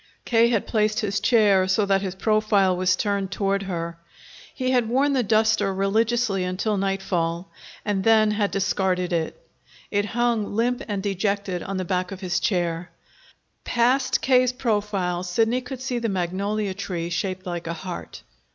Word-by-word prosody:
K. 235 0 +4
had 225 -4 +1
placed 215 -1 +1
his 200 -2 -1
chair 205 -4 +4
so 195 +2 +2
that 195 -1 +2
his 190 -2 -4
profile 210 -2 +2
was 185 0 +2
turned 200 -1 -1
toward 195 0 0
her. 170 -3 -4 0.5
He 255 -1 -2
had 245 -3 +2
worn 275 +4 +2
the 260 - +2
duster 220 -2 +2
religiously 215 +1 +1
until 185 +4 -1
nightfall, 190 -3 -1 0.3
and 200 -2 0
then 220 -1 +5
had 210 -1 0
discarded 190 -2 0
it. 170 - -3 0.4
It 205 0 +1
hung 230 -2 0
limp 240 +2 +1
and 200 -3 -3
dejected 200 -2 -1
on 195 0 -4
the 185 - -2
back 180 +1 -1
of 195 0 -7
his 180 -2 0
chair. 175 -2 -1 0.7
Past 255 +3 +2
K.'s 255 -1 +4
profile 205 -7 -1
Sidney 225 +7 +1
could 250 0 -8
see 250 -2 -2
the 230 -1 -1
magnolia 195 +2 -1
tree 175 -3 -4
shaped 185 +2 -3
like 175 -2 -4
a 170 - -2
heart. 170 +2 -7
200 Hz, 160 wpm, -24 LUFS, 185-225 Hz, 0.7 s, then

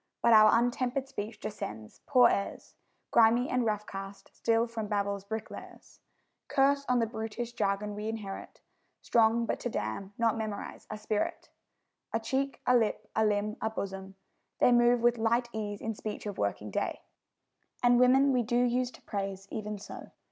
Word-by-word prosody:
But 235 - +6
our 215 +1 +7
untempered 245 +2 0
speech 220 -5 -6
descends 110 - -7
poor 250 -3 +6
heirs! 200 - -2 0.4
Grimy 235 +2 +5
and 250 -2 +1
rough 210 -1 -1
cast 195 0 -9
still 230 0 +2
from 225 -2 -5
Babel's 200 -1 -1
bricklayers: 220 +2 -8 0.5
Curse 280 +1 +2
on 250 - +3
the 230 - +2
brutish 225 +1 -5
jargon 205 -1 -1
we 210 +1 -4
inherit, 210 -3 -7 0.4
Strong 230 0 +3
but - - -2
to 245 - -3
damn, 150 - -4
not 230 -1 +2
memorise, 215 -2 -5
a 215 - -5
spirit! 210 0 -3 0.6
A 225 - +2
cheek, 270 +4 -2
a 250 - +4
lip, 215 -2 0
a 220 - +3
limb, 210 0 0
a 220 - 0
bosom, 195 -2 -6 0.4
they - - +4
Move 240 0 +4
with 240 0 +3
light 235 +2 +1
ease 205 -2 -4
in 225 - -2
speech 215 0 -6
of 205 -2 -5
working 100 +1 -2
day; - - -2 0.8
And 245 0 +5
women 265 +2 +5
we 250 - +3
do 240 +1 0
use 245 0 +2
to - - -16
praise 195 -1 -4
even 210 -1 -4
so. 200 - -10
220 Hz, 170 wpm, -30 LUFS, 205-240 Hz, 0.8 s, our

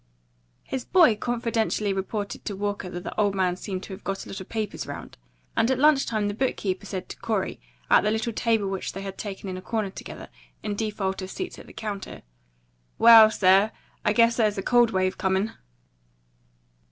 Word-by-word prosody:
His 260 -2 -4
boy 345 -11 +5
confidentially 225 -3 -1
reported 200 +2 -4
to 205 - -3
Walker 205 -1 -3
that 175 0 -6
the - - -6
old 200 -1 +1
man 185 -2 +1
seemed 190 0 -5
to 195 - -8
have 190 - -10
got 195 0 -3
a - - -11
lot 195 - -6
of 190 - -11
papers 220 -3 -3
round; - - -8 0.4
and 225 +1 +2
at 260 - +2
lunch 290 0 +4
the 210 -2 -1
book 260 +4 0
keeper 195 +1 -3
said 190 -2 -5
to - - -8
Corey, 215 -4 -2 0.3
at - - +6
the 210 - +1
little 220 +1 -1
table 225 -2 +1
which 195 -1 -3
they 195 - -6
had 195 -1 -6
taken 200 -1 -6
in 185 -1 -4
a - - -7
corner 210 0 -2
together, - - -9 0.3
in 210 - -2
default 200 -3 -2
of 185 - -6
seats 365 - -6
at - - -13
the - - -13
counter, 205 -3 -6 0.7
"Well, 225 -1 +9
sir, 195 +1 +4 0.3
I 210 - +3
guess 230 +1 +4
there's 215 -3 +2
a 195 - -2
cold 240 -1 +4
wave 185 -2 0
coming." 190 +3 +1
205 Hz, 200 wpm, -25 LUFS, 195-225 Hz, 0.7 s, Well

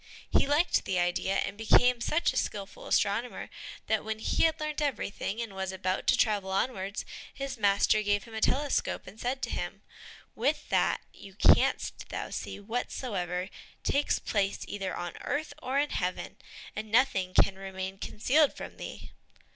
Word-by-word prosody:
He - - +4
liked 295 +5 +3
the 185 - 0
idea, 175 +2 +1
and 200 +1 0
became 235 +3 +4
such 305 +7 +2
a - - -9
skillful 200 -1 -3
astronomer 220 +4 0 0.3
that 220 -1 +1
when 220 0 -3
he 220 - +2
had 320 - +2
learnt 305 0 -2
everything, 225 -6 -2
and 230 -4 -4
was 190 0 -3
about 185 0 -2
to - - +5
travel 205 -4 +2
onwards, 195 0 -1 0.3
his 275 -1 -4
master 205 -1 +3
gave 205 -1 +1
him 230 - -13
a 220 - -4
telescope 280 +4 +1
and 215 - -12
said 265 +2 -2
to - - -1
him, - - -4 0.5
"With - - 0
that - - +2
you 195 -1 -13
canst - - +3
thou - - -4
see - - -5
whatsoever 195 -5 -3 0.3
takes 285 +1 +2
place 200 -2 -1
either 195 -2 -3
on 175 0 -5
earth 290 +2 -2
or 260 -1 -1
in 290 +1 +2
heaven, 180 -1 -2 0.4
and 215 0 -4
nothing 195 -7 +3
can 190 0 +4
remain 190 0 -5
concealed 280 +10 +2
from - - -8
thee." - - -8
210 Hz, 165 wpm, -30 LUFS, 195-255 Hz, 0.5 s, to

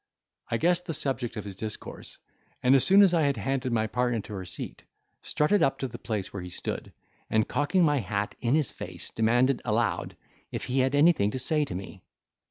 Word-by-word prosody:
I 115 - +1
guessed 175 +5 +1
the 165 - -1
subject 130 -5 -2
of 105 - -4
his 100 -2 -7
discourse, 110 +2 -7 0.5
and 125 - +5
as 135 - +6
soon 195 +2 +7
as 185 -3 +4
I 165 - +3
had 140 -2 +1
handed 135 -1 -1
my 110 -2 +1
partner 120 +1 0
to 105 - -10
her 95 -2 -5
seat, - - -6 0.4
strutted 175 +6 +2
up 135 - +2
to 135 - -3
the 120 -1 -9
place 105 -4 -4
where 100 - -4
he 90 - -7
stood, - - -5 0.4
and, 110 -1 +2
cocking 145 +5 +2
my 145 -3 +3
hat 105 -3 -2
in 120 +3 +2
his 155 -6 +1
face, - - -8
demanded 120 +3 +2
aloud, 115 0 -1 0.3
if - - -4
he 130 +2 0
had 130 +2 +2
anything 145 -8 +4
to 120 - -4
say 150 +4 +1
to 130 - -6
me. 95 0 -8
125 Hz, 210 wpm, -28 LUFS, 110-145 Hz, 0.5 s, soon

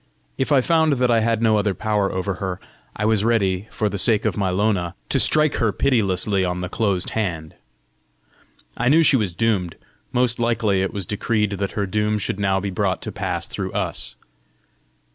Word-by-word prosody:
If 135 - -2
I 140 -3 +5
found 160 +1 +3
that 125 -2 +1
I 115 - +4
had 115 0 0
no 110 -1 +4
other 100 -2 0
power 105 0 0
over 95 +1 -2
her, 95 -1 -3 0.4
I 105 - -2
was 110 -2 +2
ready, 100 -4 +1
for 110 - -1
the 100 -1 -3
sake 110 +2 +2
of - - 0
my 100 -3 0
Lona, 95 -2 0
to - - +1
strike 155 -1 +3
her 115 -3 +1
pitilessly 100 -5 +1
on 90 0 -2
the 90 - -4
closed 100 -5 -1
hand! 85 -8 -3 1.2
I 120 +1 +1
knew 160 +4 +5
she 140 - +5
was 100 -8 0
doomed: 100 -7 0 0.4
most 125 -1 +1
likely 115 -5 +1
it 95 - -1
was 100 -3 -4
decreed 105 +2 -1
that 100 0 -3
her 100 - -1
doom 105 +2 0
should 105 -1 -3
now 95 -1 +1
be 100 0 -4
brought 90 - -1
to - - -5
pass - - -3
through - - -5
us! - - -2
105 Hz, 195 wpm, -22 LUFS, 95-115 Hz, 1.2 s, I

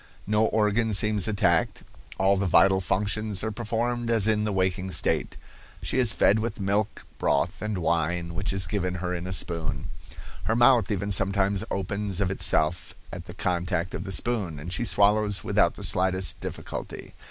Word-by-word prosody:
"No 105 +1 +2
organ 110 0 +1
seems 105 -1 +1
attacked; 90 -6 +1 0.3
all 95 +1 +3
the 100 0 -1
vital 95 +2 +4
functions 105 +1 -1
are 110 - -2
performed 120 +2 -2
as 115 -4 +3
in 110 -1 +1
the 105 - -1
waking 95 -1 -1
state. - - 0 0.5
She - - -1
is 120 -4 +6
fed 105 +2 +3
with 110 -1 -4
milk, 100 +2 -1
broth 85 +7 0
and 105 -2 -3
wine, 85 0 -1
which 95 +4 -2
is 95 -1 0
given 90 0 -2
her 90 0 -3
in 90 0 -4
a - - -5
spoon. 85 -3 -1 0.6
Her 110 - +1
mouth 120 0 +4
even 100 -1 -2
sometimes 100 0 +1
opens 100 0 -3
of 95 -2 0
itself 85 -3 0 0.2
at - - -7
the - - -10
contact 90 0 -2
of 85 - -4
the 95 - -5
spoon, 95 -4 0
and 85 +5 -6
she 120 - -1
swallows 105 -1 +2
without - - +2
the - - -8
slightest 95 0 +1
difficulty. - - -7
100 Hz, 175 wpm, -26 LUFS, 90-105 Hz, 0.6 s, is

